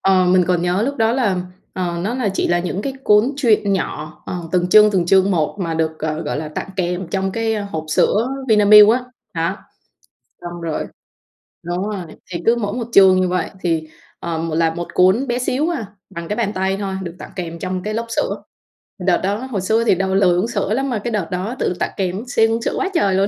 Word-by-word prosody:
ờ, 190 Hz, -1 st, +3 dB
mình 180 Hz, 0 st, +4 dB
còn 175 Hz, -2 st, +1 dB
nhớ 180 Hz, +3 st, +1 dB
lúc 280 Hz, +4 st, -2 dB
đó 225 Hz, 0 st, +2 dB
là, 225 Hz, -8 st, +1 dB, 0.4 s
ờ, 175 Hz, -2 st, -3 dB
nó 225 Hz, +5 st, -2 dB
là 250 Hz, -5 st, 0 dB
chỉ -, -, 0 dB
là 175 Hz, 0 st, +2 dB
những 180 Hz, +3 st, -3 dB
cái 270 Hz, -, -3 dB
cuốn 210 Hz, +6 st, +4 dB
truyện 215 Hz, -7 st, +2 dB
nhỏ, 155 Hz, -4 st, -4 dB
ờ, 180 Hz, -, -4 dB, 0.2 s
từng 180 Hz, 0 st, +1 dB
chương 210 Hz, +2 st, +7 dB
từng 180 Hz, -4 st, +1 dB
chương 190 Hz, +1 st, +4 dB
một 165 Hz, 0 st, 0 dB
mà 165 Hz, -3 st, -2 dB
được, 160 Hz, -1 st, -1 dB
ờ, 155 Hz, +1 st, -3 dB
gọi 150 Hz, -2 st, -3 dB
là 155 Hz, 0 st, -4 dB
tặng 155 Hz, -, -5 dB
kèm 180 Hz, -1 st, -2 dB
trong 190 Hz, 0 st, -1 dB
cái, 225 Hz, 0 st, 0 dB
ơ, 210 Hz, -2 st, -3 dB
hộp 160 Hz, -1 st, -4 dB
sữa 215 Hz, +9 st, +2 dB, 0.2 s
Vinamilk 210 Hz, -1 st, +8 dB
á. 245 Hz, +2 st, +1 dB, 0.3 s
Đó, 165 Hz, +4 st, -1 dB, 0.9 s
xong 175 Hz, 0 st, -7 dB
rồi 160 Hz, -2 st, -3 dB, 0.8 s
đúng 180 Hz, +4 st, -3 dB
rồi, 205 Hz, -3 st, -4 dB, 0.3 s
thì 170 Hz, -, -4 dB
cứ 230 Hz, +1 st, +5 dB
mỗi 205 Hz, -3 st, -2 dB
một 235 Hz, -1 st, -4 dB
chương 190 Hz, -3 st, +6 dB
như 185 Hz, -, +1 dB
vậy 180 Hz, -2 st, -1 dB
thì, 160 Hz, -2 st, -1 dB, 0.3 s
ờ, 165 Hz, -1 st, -3 dB, 0.2 s
là 165 Hz, -1 st, +2 dB
một 175 Hz, +1 st, -5 dB
cuốn 190 Hz, +9 st, +3 dB
bé 240 Hz, +1 st, -1 dB
xíu 270 Hz, +6 st, 0 dB
à, 275 Hz, -11 st, -3 dB, 0.2 s
bằng 170 Hz, -3 st, -7 dB
cái 210 Hz, -, -2 dB
bàn 220 Hz, -3 st, -1 dB
tay 190 Hz, 0 st, -1 dB
thôi, 195 Hz, -2 st, -3 dB
được 170 Hz, -1 st, -7 dB
tặng -, -, -9 dB
kèm 170 Hz, -2 st, -5 dB
trong 185 Hz, 0 st, -3 dB
cái 215 Hz, 0 st, -3 dB
lốc 230 Hz, +1 st, -2 dB
sữa. -, -, -2 dB, 0.6 s
Đợt 180 Hz, -1 st, +2 dB
đó 195 Hz, +2 st, +1 dB
hồi 240 Hz, -6 st, -4 dB
xưa 220 Hz, +4 st, +1 dB
thì 210 Hz, -, +3 dB
đòi 190 Hz, +1 st, -1 dB
lười 180 Hz, -3 st, +4 dB
uống 190 Hz, -, +1 dB
sữa 210 Hz, -3 st, -1 dB
lắm, 270 Hz, +3 st, -1 dB
mà 230 Hz, -4 st, -1 dB
cái 240 Hz, -, -2 dB
đợt 200 Hz, -6 st, -1 dB
đó 190 Hz, +7 st, -3 dB
tự -, -, 0 dB
tặng -, -, -1 dB
kèm 190 Hz, +2 st, -2 dB
siêng 225 Hz, -2 st, +2 dB
uống 230 Hz, +1 st, -1 dB
sữa -, -, -1 dB
quá 390 Hz, -, 0 dB
trời 195 Hz, -, +2 dB
luôn. 195 Hz, +1 st, +2 dB
190 Hz, 235 wpm, -19 LUFS, 175-220 Hz, 0.9 s, Vinamilk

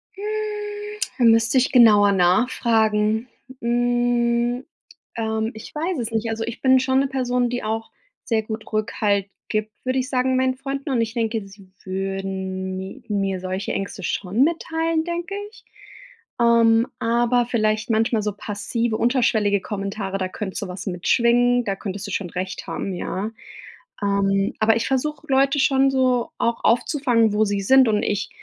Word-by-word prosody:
Hm, 395 Hz, -, -9 dB, 1.0 s
da -, -, +2 dB
müsste 225 Hz, +2 st, +4 dB
ich 260 Hz, +1 st, +3 dB
genauer 210 Hz, -5 st, +6 dB
nachfragen. 215 Hz, +3 st, +2 dB, 0.3 s
Hm, 240 Hz, +1 st, +1 dB, 0.5 s
ähm, 220 Hz, 0 st, -1 dB
ich 220 Hz, +1 st, -11 dB
weiß 330 Hz, +1 st, -2 dB
es 230 Hz, -1 st, -3 dB
nicht. 225 Hz, 0 st, -1 dB
Also, 225 Hz, 0 st, -2 dB
ich 230 Hz, 0 st, -6 dB
bin 260 Hz, -1 st, +5 dB
schon 260 Hz, 0 st, +2 dB
'ne 275 Hz, -, +2 dB
Person, 250 Hz, -2 st, 0 dB
die 245 Hz, 0 st, -3 dB
auch 225 Hz, +1 st, -3 dB, 0.3 s
sehr 225 Hz, -2 st, 0 dB
gut 220 Hz, 0 st, -7 dB
Rückhalt 205 Hz, -2 st, 0 dB, 0.2 s
gibt, 215 Hz, 0 st, -1 dB
würde 255 Hz, +1 st, 0 dB
ich 255 Hz, +1 st, -3 dB
sagen, 255 Hz, -1 st, +1 dB
meinen 260 Hz, 0 st, +1 dB
Freunden, 275 Hz, +1 st, -5 dB
und 245 Hz, -3 st, +2 dB
ich 225 Hz, 0 st, -2 dB
denke, 225 Hz, -1 st, -1 dB
sie 195 Hz, -1 st, -16 dB
würden 190 Hz, 0 st, -4 dB
mi 190 Hz, +8 st, -8 dB
mir 195 Hz, -2 st, -1 dB
solche 185 Hz, +2 st, -3 dB
Ängste 195 Hz, 0 st, -4 dB
schon 200 Hz, +7 st, 0 dB
mitteilen, 325 Hz, 0 st, -1 dB
denke 345 Hz, +2 st, -4 dB, 0.2 s
ich. 450 Hz, -, -19 dB, 0.7 s
Ähm, 230 Hz, 0 st, +4 dB
aber 240 Hz, +1 st, +2 dB
vielleicht 215 Hz, -2 st, 0 dB
manchmal 225 Hz, 0 st, +2 dB
so 210 Hz, -, -1 dB
passive, 225 Hz, +1 st, -3 dB
unterschwellige 225 Hz, -5 st, +2 dB
Kommentare, 195 Hz, -1 st, -4 dB
da 185 Hz, -1 st, -2 dB
könnte 190 Hz, 0 st, -6 dB
sowas 185 Hz, +2 st, -6 dB
mitschwingen. 240 Hz, +6 st, +2 dB
Da 195 Hz, -, -1 dB
könntest 195 Hz, +1 st, -6 dB
du -, -, -6 dB
schon 185 Hz, -1 st, -3 dB
recht 185 Hz, +1 st, -5 dB
haben, 195 Hz, -, -4 dB
ja. 190 Hz, +4 st, -4 dB, 0.7 s
Ähm, 195 Hz, 0 st, +1 dB
aber 220 Hz, 0 st, +4 dB
ich 230 Hz, -, -2 dB
versuche, 285 Hz, +3 st, -2 dB
Leute 275 Hz, +1 st, +3 dB
schon 270 Hz, 0 st, +3 dB
so 255 Hz, -2 st, +1 dB
auch 235 Hz, 0 st, 0 dB
aufzufangen, 240 Hz, -2 st, +2 dB
wo 210 Hz, +1 st, +3 dB
sie 200 Hz, -1 st, -1 dB
sind. 260 Hz, +5 st, +5 dB
Und 210 Hz, -1 st, +2 dB
ich, 205 Hz, 0 st, -1 dB
225 Hz, 160 wpm, -22 LUFS, 200-250 Hz, 1.0 s, genauer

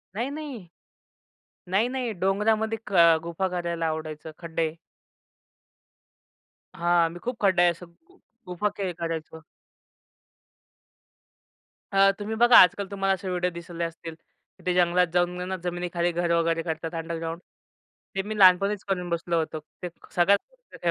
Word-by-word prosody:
नाही, 240 Hz, +5 st, -2 dB
नाही. 285 Hz, -, -7 dB, 1.0 s
नाही, 210 Hz, +6 st, +2 dB
नाही 250 Hz, -3 st, -3 dB
डोंगरामध्ये 220 Hz, +3 st, +1 dB
क 205 Hz, -, -9 dB
अ, 170 Hz, -2 st, +7 dB
गुफा 170 Hz, +3 st, -2 dB
करायला 170 Hz, -2 st, -2 dB
आवडायचं, 155 Hz, 0 st, -5 dB
खड्डे. 165 Hz, -2 st, -2 dB, 2.0 s
हां, 170 Hz, -1 st, +2 dB
मी 175 Hz, -, -9 dB
खूप 245 Hz, 0 st, -3 dB
खड्डा 190 Hz, -3 st, +3 dB
आहे 175 Hz, -, +5 dB
असं 170 Hz, +1 st, -10 dB
गु 360 Hz, -, -27 dB, 0.3 s
गुफा 180 Hz, +4 st, -1 dB
खेळ 195 Hz, -3 st, -2 dB
करायचो. 165 Hz, -1 st, -5 dB, 2.5 s
अ, 195 Hz, 0 st, +6 dB
तुम्ही 210 Hz, +2 st, -4 dB
बघा 240 Hz, 0 st, +8 dB
आजकाल 195 Hz, +2 st, +6 dB
तुम्हाला 195 Hz, -1 st, +1 dB
असे 190 Hz, 0 st, -5 dB
व्हिडिओ 180 Hz, 0 st, 0 dB
दिसले 170 Hz, 0 st, -6 dB
असतील, 165 Hz, 0 st, -6 dB, 0.5 s
ते 180 Hz, -, +1 dB
जंगलात 180 Hz, 0 st, +3 dB
जाऊन 175 Hz, 0 st, +2 dB, 0.2 s
ना, 190 Hz, -, -2 dB
जमिनीखाली 175 Hz, 0 st, -1 dB
घर 170 Hz, 0 st, -1 dB
वगैरे 165 Hz, 0 st, +1 dB
करतात 160 Hz, 0 st, -4 dB
अंडरग्राउंड, 165 Hz, 0 st, -4 dB, 0.8 s
ते 195 Hz, -, +1 dB
मी 210 Hz, +2 st, -5 dB
लहानपणीच 195 Hz, +2 st, +5 dB
करून 180 Hz, -2 st, -1 dB
बसलो 170 Hz, 0 st, -1 dB
होतो. 155 Hz, -1 st, -3 dB, 0.2 s
ते 180 Hz, -, -3 dB, 0.3 s
सगळ्यात 195 Hz, +3 st, +4 dB
मोठा -, -, -6 dB
180 Hz, 140 wpm, -26 LUFS, 170-200 Hz, 2.5 s, बघा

